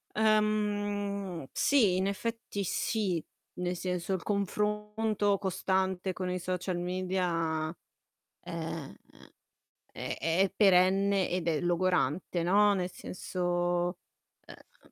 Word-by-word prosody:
Uhm, 205 -4 0
sì, 225 -10 +4
in 190 +1 +1
effetti 230 0 -3
sì. 190 -3 0 0.3
Nel 180 0 -2
senso, 180 +1 -2
il 185 - -2
confronto 210 +1 0
costante 190 -1 0
con 185 0 -3
i 180 0 -1
social 180 0 -2
media 175 -3 -1 0.7
ehm, 165 -3 -5 1.0
è - - -4
è 165 +3 0
è 190 - -2
perenne 195 0 +4
ed 180 -1 -1
è 155 -3 +1
logorante, 175 -2 +1
no. 205 +4 +4
Nel 185 -1 -1
senso 175 -1 -1 0.5
ehm - - -17
185 Hz, 105 wpm, -30 LUFS, 175-205 Hz, 1.0 s, sì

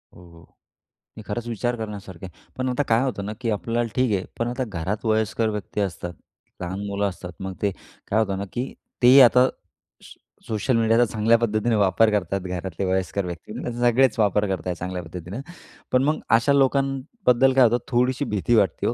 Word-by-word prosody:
हो, - - -14
हो 85 0 -16 0.7
मी 110 - -8
खरंच 120 +3 -4
विचार 120 +2 -1
करण्यासारखं 100 -5 -7
आहे. 90 - -15
पण 130 0 -1
आता 125 +3 0
काय 115 +1 +3
होतं 100 -7 -3
ना 105 - -4
की 115 - -1
आपल्याला 115 +4 -1
ठीक 125 -3 +2
आहे, 95 - -5 0.2
पण 115 - 0
आता 125 +2 -2
घरात 100 +3 -4
वयस्कर 110 0 +1
व्यक्ती 105 0 -4
असतात, 90 -2 -4 0.5
लहान 90 +2 -4
मुलं 100 0 -1
असतात, 90 -1 -9
मग 95 0 -5
ते 100 - +1 0.4
काय 110 - +1
होतं 100 -3 0
ना, 100 - -3
की 125 +2 -3 0.3
तेही 125 +3 +8
आता 125 +1 +6 0.6
सो - - -15 0.3
सोशल 115 +3 0
मीडियाचा 115 +1 +4
चांगल्या 115 +1 +3
पद्धतीने 115 0 +1
वापर 100 +2 +3
करतात 100 -1 -1
घरातले 90 0 -4
वयस्कर 95 +1 -1
व्यक्ती, 85 +3 -7
त्याचे 120 -1 -5
सगळेच 120 +1 +3
वापर 105 -1 +2
करत 95 -1 -3
आहेत 90 -1 -2
चांगल्या 90 0 -5
पद्धतीनं. 90 +7 -7 0.5
पण 130 +1 +3
मग 150 +2 +1 0.2
अशा 140 +5 +2
लोकांबद्दल 135 - +2
काय 130 0 +6
होतं 120 0 +4
थोडीशी 130 +2 +1
भीती 105 +2 0
वाटते 100 -7 +2
हो - - +1
110 Hz, 190 wpm, -23 LUFS, 95-120 Hz, 0.7 s, तेही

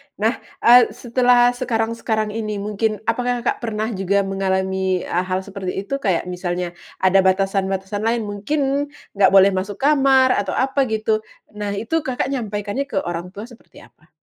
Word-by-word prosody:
Nah, 220 +4 0 0.2
eee, 245 +1 +8
setelah 245 0 +3
sekarang-sekarang 225 -3 -1
ini 215 -1 -3
mungkin 210 +1 -2
apakah 245 +2 -1
Kakak - - -1
pernah 220 -1 -3
juga 200 0 0
mengalami 190 -1 -1
a 180 +2 -2
hal 185 0 -1
seperti 190 -2 -6
itu 275 +7 -3
kayak 190 -9 0
misalnya 180 -1 -3 0.3
ada 190 +1 +5
batasan-batasan 195 +1 0
lain 225 +2 0
mungkin 275 +8 -1 0.2
nggak 195 -2 +3
boleh 195 +1 +7
masuk 190 +2 -3
kamar 270 0 +4
atau 200 -6 -1
apa 270 +1 +1
gitu? 220 -1 0 0.3
Nah 205 -1 -4
itu 230 +11 -1
Kakak 265 -3 -3
nyampaikannya 215 +1 -3
ke 275 - -8
orang 175 0 -4
tua 205 - -6
seperti 240 0 -15
apa? - - -23
210 Hz, 155 wpm, -20 LUFS, 195-245 Hz, 0.3 s, eee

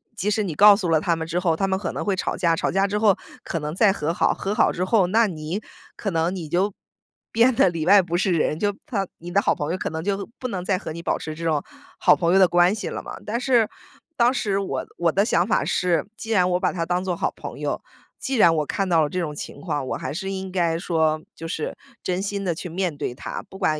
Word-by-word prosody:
即 210 -1 -1
使 215 - +1
你 175 -6 -4
告 205 +3 +8
诉 195 -4 -2
了 160 -1 +4
他 170 +2 +1
们 160 0 -4
之 170 +2 -1
后， 170 -3 +1
他 195 +4 0
们 190 0 +1
可 - - -3
能 - - -4
会 200 -2 0
吵 185 - -2
架， 170 -3 +2
吵 - - -1
架 195 +1 +2
之 205 +1 -1
后 210 -3 +5 0.3
可 165 - -3
能 150 0 -4
再 205 +1 +5
和 160 -4 -2
好， - - +2
和 195 - -3
好 - - +4
之 180 - -2
后， 195 0 +3
那 220 +4 +3
你 165 +2 -4 0.3
可 205 - -3
能 165 +2 0
你 165 -5 -6
就 190 +5 +1 0.6
变 235 +3 +4
得 190 - +5
里 165 -2 -3
外 200 +3 +7
不 175 -1 -2
是 190 +1 +1
人。 155 -2 +1
就 205 +3 0
她 205 -9 -1
你 170 - -8
的 200 - +3
好 - - +3
朋 150 +2 -3
友 180 - -1
可 - - -3
能 160 0 -4
就， 200 +1 -2
不 255 - -3
能 185 -6 -4
再 190 -1 +1
和 175 - -6
你 170 +2 -6
保 - - 0
持 155 -1 -6
这 165 - -8
种 155 -3 +1 0.4
好 - - +6
朋 170 -1 +1
友 190 - +6
的 190 - +7
关 175 +2 +4
系 215 - -4
了 - - -5
嘛。 - - -7
但 220 +3 -2
是 245 -4 +3 0.5
当 240 +1 +4
时 215 -5 0
我 195 - -3
我 170 -1 +2
的 195 - +2
想 180 -4 +2
法 - - +2
是， 180 0 +1
既 225 - -6
然 185 -4 +3
我 180 0 +1
把 - - +1
她 170 -3 -2
当 180 +2 0
作 180 -2 -1
好 - - -1
朋 - - -8
友， - - -2 0.4
既 270 - -2
然 170 -6 +6
我 155 -1 0
看 195 +5 -2
到 165 -3 +4
了 150 - -1
这 180 - -3
种 155 -4 -3
情 145 - -8
况， 145 -2 -2
我 - - -2
还 - - -5
是 190 +4 -4
应 190 -1 -5
该 170 -3 +1
说， 160 -3 +1
就 165 - -7
是 160 -2 -4 0.3
真 180 0 -1
心 200 0 -3
地 175 -3 -1
去 180 +2 -6
面 175 -2 -2
对 125 - -3
她， - - -6
不 190 - -10
管 155 -5 +1
180 Hz, 295 characters per minute, -23 LUFS, 165-200 Hz, 0.6 s, 告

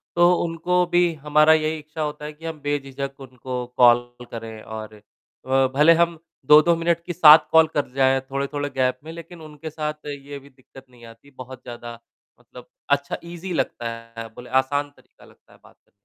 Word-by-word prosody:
तो 175 +1 +5
उनको 175 +2 0
भी 175 -1 +2
हमारा 150 +1 +5
यही 155 0 0
इच्छा 155 +1 -8
होता 150 0 -4
है 150 - -7
कि 160 +2 -14
हम 160 -2 -5
बेझिझक 140 -1 -4
उनको 125 -1 -6
कॉल 120 0 +4 0.2
करें 115 -1 -8
और 110 -1 -8
अ, 105 - -18 0.7
भले 150 +4 +6
हम 170 -1 +1 0.3
2-2 155 +4 +6
मिनट 170 0 0
की 175 - -4
7 155 -2 +8
कॉल 160 0 +6
कर 145 -3 -1
जाए 135 0 +3
थोड़े-थोड़े 140 +2 -4
गैप 130 -1 -1
में, 160 - -9
लेक़िन 170 +1 -11
उनके 155 0 -9
साथ 150 -1 -5
ये 140 0 -7
भी 140 +1 -18
दिक़्क़त 135 0 -17
नहीं 120 -2 -17
आती, 115 +5 -16
बहुत 130 -1 -11
ज़्यादा 120 -1 -9 0.4
मतलब - - -15 0.2
अच्छा 140 0 0
ईज़ी 175 +2 -7
लगता 120 -7 -2 0.3
है 115 - -6
बोले 125 - -11
आसान 145 +2 -3
तरीक़ा - - -22
लगता - - -23
है - - -21
बात - - -20
करना। - - -38
145 Hz, 185 wpm, -22 LUFS, 130-160 Hz, 0.7 s, 7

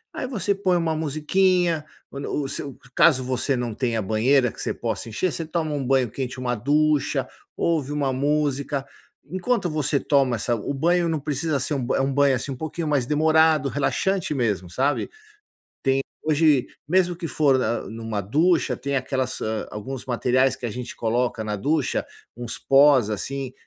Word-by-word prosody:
Aí - - -3
você 210 -5 0
põe 190 -2 +1
uma 165 -2 0
musiquinha, 160 +2 +1 0.2
quando 140 +1 -6
o 145 -2 -1
seu 140 0 -6 0.2
caso 140 -6 +5
você 130 +2 0
não 120 -2 -2
tenha 115 -1 -1
banheira 120 +5 +2
que - - -10
você - - -1
possa 115 0 -4
encher, 165 +11 -1
você 165 - -3
toma 155 -1 -2
um 145 - -2
banho 130 -3 +2
quente, 130 0 -5
uma 125 -1 -1
ducha, 150 +5 +1 0.3
ouve 155 -5 0
uma 140 -3 0
música. 140 0 0 0.4
Enquanto 185 - -1
você 150 -2 0
toma 135 -4 +2
essa 120 +2 -1
o 110 - -4
banho 170 +4 +2
não 160 -2 0
precisa 145 +1 -1
ser 140 +3 -2 0.2
é - - +2
um 135 0 0
banho, 140 -1 +4
assim, 135 - -4
um 130 - -4
pouquinho 160 +2 -4
mais 140 -5 +1
demorado, 155 0 +3
relaxante 155 +6 0
mesmo, 105 -9 -1
sabe. 135 +9 0 0.7
Tem 135 0 +2 0.2
hoje, 155 -3 +3 0.2
mesmo 180 +1 +2
que 170 0 -5
for 140 -4 +3
na 120 -2 0
em 115 +1 -8
uma 110 -2 -3
ducha 155 - +2
tem 140 +1 -3
aquelas, 130 -1 -2
ah, 110 0 -2
alguns 125 +5 -6
materiais 130 +1 +2
que 125 - -7
a 115 - -3
gente 125 +2 -6
coloca 120 0 -1
na 105 -1 -2
ducha, 145 +5 0 0.3
uns 120 -1 -4
pós 135 -4 +5
assim, 135 +5 -4
140 Hz, 175 wpm, -24 LUFS, 125-155 Hz, 0.7 s, caso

